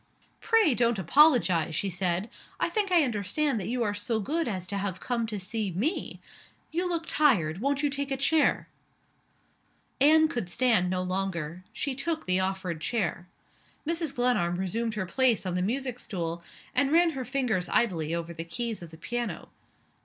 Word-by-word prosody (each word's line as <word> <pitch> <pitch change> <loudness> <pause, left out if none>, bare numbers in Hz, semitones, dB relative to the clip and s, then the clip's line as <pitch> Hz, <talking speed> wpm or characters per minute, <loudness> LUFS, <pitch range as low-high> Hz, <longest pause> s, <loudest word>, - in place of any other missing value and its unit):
"Pray 445 - +4
don't 235 -1 +2
apologize," 185 - +4
she 195 - 0
said. 180 +1 -1 0.3
"I - - +1
think 415 -3 0
I 345 -3 +6
understand 235 +3 0
that 190 - -5
you 245 0 0
are 205 -2 0
so 220 +2 -2
good 310 +10 -1
as 185 -5 -3
to 200 +3 -3
have 195 -2 -3
come 235 -2 -2
to 215 -2 -4
see 210 +2 -2
me. 220 - -2 0.5
You 355 +3 -1
look 335 -1 -1
tired. 190 - +2
Won't 280 +2 0
you 290 - +3
take 280 0 -2
a 270 - -1
chair?" 305 +3 +2 1.3
Anne 315 +3 +6
could 240 - -3
stand 225 -5 +2
no 185 0 -1
longer. 185 -2 -3
She 280 - -3
took 315 +5 -3
the 185 0 +2
offered 190 -3 -2
chair. 180 -4 -2 0.6
Mrs. 325 -3 -1
Glenarm 245 -9 +2
resumed 215 +5 -2
her 200 -3 -2
place 245 +2 +2
on 185 - -2
the 180 - 0
music 250 +5 -2
stool, 170 -5 -4 0.3
and 280 -1 +2
ran 335 +1 +5
her 270 -4 -4
fingers 245 -9 -1
idly 165 -8 +1
over 170 0 -4
the 165 0 -5
keys 225 +6 -4
of 170 - -9
the 160 - -13
piano. 240 +5 -4
225 Hz, 175 wpm, -28 LUFS, 185-275 Hz, 1.3 s, I